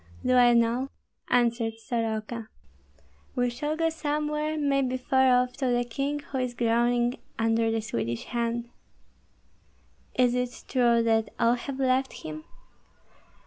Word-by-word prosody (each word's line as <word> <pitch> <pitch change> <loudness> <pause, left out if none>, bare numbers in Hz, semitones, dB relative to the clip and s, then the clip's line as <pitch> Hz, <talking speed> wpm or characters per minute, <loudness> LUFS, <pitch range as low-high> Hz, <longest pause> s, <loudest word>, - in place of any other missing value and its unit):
"Do 255 - +3
I 245 -1 +6
know?" 235 +3 +2 0.4
answered 235 -2 +2
Soroka. 225 -1 -3 0.9
"We 245 -1 +1
shall 295 +6 -3
go 330 0 +2
somewhere, 300 0 -2
maybe 275 -3 +1
far 265 0 +3
off, 250 0 -7
to 265 - -1
the 245 0 +2
king 275 +5 -2
who 275 -1 -5
is 250 -1 -2
groaning 240 +1 +1 0.2
under 225 0 +2
the 225 0 0
Swedish 115 - -3
hand." 235 0 -2 1.5
"Is 250 -1 +3
it 250 0 -3
true 235 -3 +3
that 225 -1 +2
all 235 0 +4
have 260 +2 -5
left 265 0 +1
him?" 155 0 -7
245 Hz, 135 wpm, -27 LUFS, 230-265 Hz, 1.5 s, I